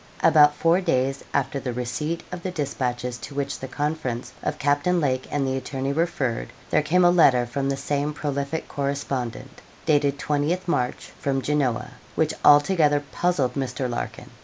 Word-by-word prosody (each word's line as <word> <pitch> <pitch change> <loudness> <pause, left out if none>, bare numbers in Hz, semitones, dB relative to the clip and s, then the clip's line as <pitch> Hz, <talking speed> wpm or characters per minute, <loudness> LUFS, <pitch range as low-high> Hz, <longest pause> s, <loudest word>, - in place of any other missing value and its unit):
About 150 -1 +6
four 165 +4 +3
days 135 -5 0
after 140 0 0
the 125 -2 -4
receipt 150 +7 -3
of 180 -1 -5
the 185 - -3
despatches 125 -6 -3
to 140 - -9
which 140 -1 -2
the 130 - -6
conference 145 -3 -3
of - - -2
Captain 145 +6 +2
Lake 130 -4 0
and 145 -2 0
the 130 0 0
attorney 135 +1 -3
referred, 135 - -1 0.2
there - - +4
came 175 +4 +3
a 175 - +7
letter 130 -8 +5
from 135 +3 -2
the 135 - -1
same 145 +1 -1
prolific 145 +1 -3
correspondent, 140 -4 -3 0.2
dated 145 -2 +2
20th 150 +6 -1
March, 125 -7 -1
from 135 -1 0
Genoa, 140 -4 0 0.2
which 160 0 +1
altogether 145 -1 +5
puzzled 175 -8 +1
Mr. 130 -1 -2
Larkin. 120 -1 -5
140 Hz, 160 wpm, -24 LUFS, 130-155 Hz, 0.2 s, a